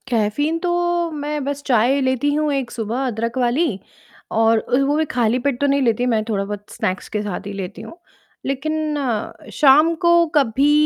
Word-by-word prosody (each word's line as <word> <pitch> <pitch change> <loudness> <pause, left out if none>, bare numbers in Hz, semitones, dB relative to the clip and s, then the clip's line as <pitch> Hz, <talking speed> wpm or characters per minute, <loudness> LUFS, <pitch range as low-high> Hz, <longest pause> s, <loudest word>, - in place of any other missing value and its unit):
caffeine 245 +8 0
तो 355 +1 -2 0.4
मैं 295 -1 -3
बस 285 0 -3
चाय 250 +2 +3
लेती 260 +2 +1
हूँ 300 0 0
1 270 -3 -2
सुबह 235 +3 -3
अदरक 230 +1 -3
वाली 255 +7 +2 0.6
और 225 0 +3
ओ - - +5
वो 290 +2 +1
भी 315 - +1
खाली 240 0 +1
पेट 275 -4 0
तो 285 - +3
नहीं 280 0 +2
लेती 240 -1 +1
मैं 215 - 0
थोड़ा-बहुत 205 0 -3
स्नैक्स 185 0 -3
के 210 - -2
साथ 200 -1 -5
ही 200 - -5
लेती 190 -2 -6
हूँ, 335 - -11 0.5
लेकिन 305 +3 -2 0.6
शाम 300 +3 +5
को 340 - +6 0.2
कभी 275 +1 +3
260 Hz, 175 wpm, -20 LUFS, 225-290 Hz, 0.6 s, को